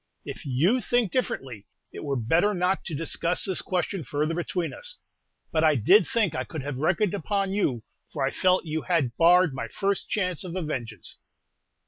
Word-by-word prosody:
If - - -7
you 170 - +2
think 235 -3 +1
differently, 130 - -3 0.2
it - - -8
were 140 -2 -1
better 165 - +2
not 180 +2 +1
to 165 - -4
discuss 165 +3 -1
this 190 -2 -2
question 185 -1 -2
further 150 +5 -1
between 175 0 -2
us; - - -4 0.5
but 160 -1 +1
I 155 -2 +5
did 180 - +5
think 230 - +1
I 130 - -2
could 140 +3 -6
have 145 -2 -4
reckoned 175 +7 +1
upon 195 +1 -1
you, 135 - 0 0.3
for - - -2
I 135 - 0
felt 185 -1 +2
you 160 0 -2
had 150 -10 0
barred 175 -1 +5
my 130 - -4
first 200 -1 -2
chance 185 -6 -1
of 180 -1 -6
a 185 - -2
vengeance." 120 - -6
170 Hz, 185 wpm, -26 LUFS, 145-195 Hz, 0.5 s, I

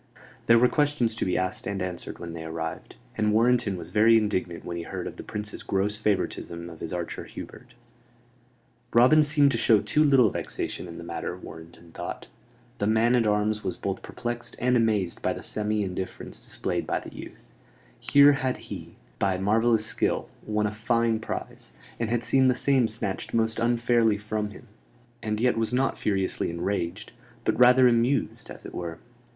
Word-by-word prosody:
There 115 - +7
were 125 +2 +6
questions 145 -5 +1
to - - -2
be 90 - 0
asked 95 0 -2
and 100 -1 -2
answered 90 -1 -5
when 85 -1 -7
they 80 -1 -6
arrived; 80 0 -5 0.2
and 105 -1 +2
Warrenton 115 -2 +2
was 85 0 -8
very 110 +3 +6
indignant 95 -5 -1
when 85 - -4
he 85 - -3
heard - - -5
of - - -6
the - - -6
Prince's 105 0 -6
gross 100 +2 -1
favoritism 90 -5 -2
of 80 - -12
his 80 - -6
archer 90 -1 -4
Hubert. - - -11 1.2
Robin 130 +6 +7
seemed 145 -1 +4
to 115 - -1
show 110 -2 +5
too 105 +9 +2
little 135 -8 +5
vexation - - -4
in 85 - -9
the - - -8
matter, 85 +1 -5
Warrenton 85 0 -12
thought. - - -6 0.5
The 100 - 0
man 110 +2 +3
at 115 -3 +2
arms 105 0 +1
was 95 - -3
both - - -3
perplexed 120 0 -5
and 125 +1 +2
amazed 105 -7 +1
by - - 0
the - - -8
semi 105 0 -1
indifference 95 -1 -5
displayed - - -3
by - - 0
the - - -11
youth: - - -11 0.5
here 145 0 +6
had 130 -2 -1
he, - - -9 0.2
by 95 -2 +1
marvellous 110 +3 +2
skill, - - -1 0.2
won 105 0 0
a 105 - 0
fine 115 +1 +1
prize, - - -6 0.3
and 115 -2 -1
had 120 0 0
seen 130 +1 +4
the 125 - +3
same 130 -2 +3
snatched 110 -2 -4
most 115 0 +1
unfairly 120 -2 +2
from 105 0 -3
him, 105 +4 -13 0.5
and 105 -1 -2
yet 120 -1 +2
was 115 +1 -1
not 130 +2 0
furiously 95 -2 -1
enraged; 90 +3 -3 0.3
but - - 0
rather 125 +1 +7
amused, 120 +3 +1
as - - -10
it - - -8
were. 85 -2 -5
110 Hz, 180 wpm, -26 LUFS, 95-120 Hz, 1.2 s, There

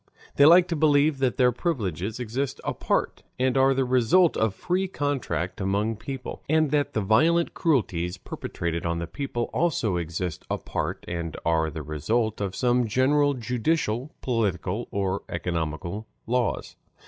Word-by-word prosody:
They 145 - +7
like 175 +2 +7
to 170 - 0
believe 145 -1 +3
that 130 -2 +1
their 125 -2 +5
privileges 110 - -2
exist 125 +3 -3
apart - - -1 0.2
and 130 0 +1
are 135 0 +4
the 135 0 +1
result 130 +8 +4
of 110 -3 +1
free 185 - -1
contract 115 - -2
among 100 +4 0
people; 130 +3 -6
and 155 -2 +3
that 145 -1 +1
the 110 - 0
violent 160 - +3
cruelties 95 - 0
perpetrated 85 -2 -4
on 85 0 -1
the 85 - -3
people 120 - -3
also 130 - +1
exist 85 0 -4
apart - - -3
and 85 -2 -4
are 80 -1 +2
the 80 0 -6
result 105 - -1
of 95 -2 -2
some 125 -1 +2
general 140 +5 +3
judicial, 125 +1 -1
political, 105 -3 -1
or 100 -1 -1
economical 85 +4 -3 0.2
laws. 120 -2 -1
115 Hz, 150 wpm, -26 LUFS, 90-140 Hz, 0.2 s, They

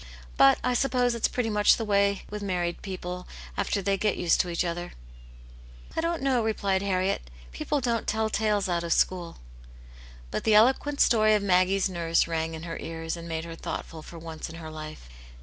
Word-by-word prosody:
But 135 - +6
I 250 - +1
suppose 250 -1 +2
it's 235 - +1
pretty 235 -3 -2
much 210 0 +5
the 225 - -3
way 200 -1 +2
with 210 0 -6
married 175 -3 -2
people 180 -2 -6 0.3
after 200 - -1
they 195 0 +1
get 210 0 +1
used 175 -2 +2
to 180 - -5
each 170 +1 0
other." 175 +1 -4 0.5
" - - -19
I - - +1
don't 335 -2 -1
know," 260 -4 +2
replied 200 -3 0
Harriet; 185 - -1
*' - - -19
people 280 - -2
don't 235 -2 -1
tell 220 0 +1
tales 210 -2 0
out 170 -1 0
of 170 - +1
school." 175 -2 0 0.9
But - - -2
the 220 -1 +4
eloquent 265 +6 +4
story 215 -2 +5
of 210 - 0
Maggie's 185 +1 +3
nurse 170 -3 +1
rang 165 -1 -2
in 160 - -8
her 165 -1 -5
ears, 165 0 -4
and 170 0 -8
made 160 0 -3
her 165 - -7
thoughtful 165 0 -6
for 170 - -11
once 165 -1 -7
in 165 - -9
her 160 -1 -8
life. 155 - -8
185 Hz, 200 wpm, -27 LUFS, 165-215 Hz, 0.9 s, But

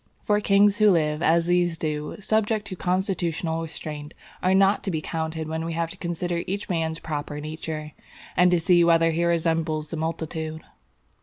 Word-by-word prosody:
For 210 0 +2
kings 205 0 +4
who 215 0 +6
live, 155 -4 +2
as 170 0 +3
these 175 -1 +2
do, 150 -2 -3
subject 215 +1 0
to 190 - -5
constitutional 175 -3 -1
restraint, 150 -1 -7 0.3
are 185 +1 +3
not 195 +1 +4
to - - -2
be 160 -4 -1
counted 160 0 -3
when 160 +1 -3
we 165 0 -3
have 165 0 -2
to 190 - -9
consider 175 -1 -2
each 200 +3 -3
man's 160 -2 -1
proper 150 -2 -5
nature, 155 0 -5 0.4
and 180 0 +5
to 175 -1 +3
see 175 0 +4
whether 165 -1 +4
he 165 +2 0
resembles 165 -2 0
the 165 - -3
multitude. 160 0 -4
165 Hz, 175 wpm, -25 LUFS, 160-180 Hz, 0.4 s, who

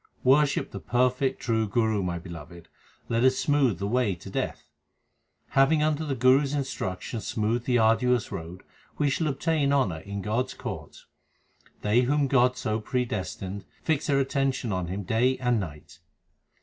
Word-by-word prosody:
Worship 140 +2 +3
the 100 - -6
perfect 125 - +1
true 110 -2 0
Guru, 110 0 +1
my 90 -2 -2
beloved; 85 -1 -10 0.4
let 115 +1 +1
us 130 0 +5
smooth 140 - +2
the 100 - -3
way 110 -2 +1
to 85 - -11
death. - - -3 0.9
Having 150 +3 +4
under 155 0 +1
the 145 -3 -2
Guru 130 +3 +5
s 140 -1 -2
instruction 115 -6 -3
smoothed 115 +2 -1
the 125 -1 +3
arduous 120 +1 +2
road, 85 +2 -7 0.3
we 145 -2 +2
shall 155 +4 0
obtain 145 0 +1
honour 115 - +1
in 100 +3 -6
God 115 +4 0
s - - -9
court. - - -7 0.8
They 105 +4 +4
whom 145 +3 +2
God 125 -2 +3
so 110 -3 -1
predestined 100 -5 -3 0.2
fix 155 -2 0
their 140 - +3
attention 135 -3 0
on 90 -2 -2
Him 95 +3 -4
day 120 +7 +2
and 125 -3 +1
night. 75 -6 -8
120 Hz, 160 wpm, -27 LUFS, 100-135 Hz, 0.9 s, us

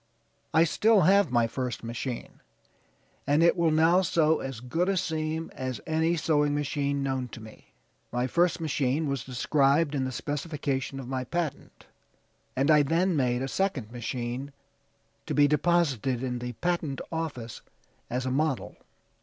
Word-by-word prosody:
I 160 0 +5
still 210 +5 +4
have 195 0 +5
my 120 -2 +3
first 125 0 -4
machine; 120 +1 -5 0.9
and 145 +3 +4
it 170 - +5
will 170 -2 +2
now 165 +4 +4
sew 160 -3 +2
as 135 -4 -5
good 165 +10 -1
a 195 - +1
seam 160 -1 -2
as 130 -4 -4
any 160 +1 +1
sewing 150 -2 +2
machine 140 -1 -1
known 130 -2 -1
to 120 - -10
me. 110 -1 -14 0.4
My 125 +1 0
first 170 +5 +2
machine 150 -1 0
was 140 -3 -2
described 140 +4 +2
in 135 -2 0
the 130 - -3
specification 140 -1 -3
of 130 - -7
my 130 0 -2
patent, 165 +2 -4 0.7
and 140 +4 +3
I 150 -1 +7
then 170 +5 +1
made 125 -2 +1
a - - -2
second 135 - -1
machine, 125 +3 -4 0.7
to - - -2
be 145 -1 +6
deposited 145 -6 +1
in 125 -1 -2
the 125 0 -5
patent 165 -1 -2
office 145 -9 -4 0.5
as 125 +2 -2
a 130 - -1
model." 145 0 -1
145 Hz, 155 wpm, -28 LUFS, 130-160 Hz, 0.9 s, I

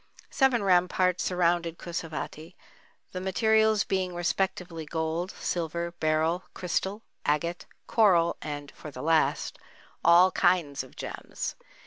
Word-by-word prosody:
Seven 260 -5 +3
ramparts 180 -1 +3
surrounded 170 -2 +1
Kusavati, 165 0 -6 0.6
the 185 - -5
materials 220 +2 +3
being 185 -2 -1
respectively 175 -1 -2
gold, 160 +3 -2
silver, 170 -1 -3
beryl, 160 +3 +1
crystal, 190 +4 -2 0.2
agate, 170 +4 -1 0.2
coral 180 -7 +4
and 145 -1 -6
(for 150 - -10
the 130 -2 -8
last) 160 0 +1 0.4
"all 175 +3 +7
kinds 145 -7 +2
of 130 - -16
gems." - - -5
175 Hz, 110 wpm, -28 LUFS, 160-185 Hz, 0.6 s, all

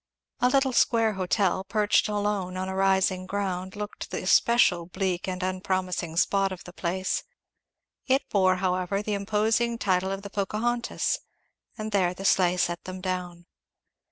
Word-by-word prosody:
A 250 - +4
little 270 0 +2
square 225 -2 +3
hotel, 190 0 0
perched 210 +1 +2
alone 205 -3 -1
on 185 0 -3
a 190 - -3
rising 190 -1 +2
ground, 190 -1 -3
looked 210 0 -6
the - - -4
especial 180 -8 +4
bleak 185 -1 -2
and 185 0 -3
unpromising 185 -2 -2
spot 195 +1 +2
of 180 -2 -7
the 180 - -11
place. 185 +1 -1 0.9
It 265 +1 +2
bore 185 -2 +4
however 185 +2 -1
the 210 - -2
imposing 220 +4 +1
title 190 -2 +1
of 195 0 -4
the 200 - -8
Pocahontas; 230 +4 -1 0.6
and 215 0 -4
there 180 -3 +1
the 195 - -7
sleigh 180 -2 +3
set 175 -1 -1
them 185 0 -6
down. 180 -2 -4
190 Hz, 155 wpm, -26 LUFS, 185-210 Hz, 0.9 s, A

